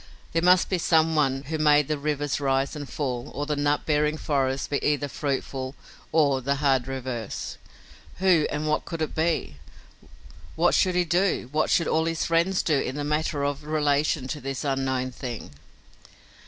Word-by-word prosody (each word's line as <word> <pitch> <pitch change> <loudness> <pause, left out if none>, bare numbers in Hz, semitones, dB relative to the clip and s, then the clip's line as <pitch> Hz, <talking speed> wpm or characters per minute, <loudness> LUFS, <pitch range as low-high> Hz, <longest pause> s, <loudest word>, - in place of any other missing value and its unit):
There 165 - +1
must 180 +1 +5
be 185 - 0
some 160 -1 +3
one 135 -3 +1
who 155 +3 -4
made 150 -2 +4
the 155 - 0
river 145 0 -2 0.2
rise 135 +2 +1
and 145 -2 -6
fall 125 -5 -3
or 145 - -2
the 150 0 -1
nut 145 0 0
bearing 150 0 +1
forest 135 -3 -1
be 140 - -1
either 145 -1 +1
fruitful 135 -1 -3 0.4
or 145 -4 +3
the 140 +2 0
hard 135 -3 +1
reverse. 130 -5 -5 0.6
Who 180 -4 +3
and 150 +1 -3
what 150 - +1
could 165 -2 -4
it 155 - -4
be? 160 - -1 1.0
What 170 +2 +3
should 185 -2 +3
he 180 0 +2
do, 175 -6 +1
what 155 +1 +1
should 170 - +2
all 160 0 +2
his 165 0 -1
friends 170 +3 +2
do 150 -4 +2
in 130 - -3
the 145 - -3
matter 150 0 -1
of 145 +1 -2
relation 150 -2 +1
to 150 - -4
this 135 -1 -4
unknown 135 -2 -1
thing? 120 - -7
145 Hz, 180 wpm, -25 LUFS, 135-160 Hz, 1.0 s, must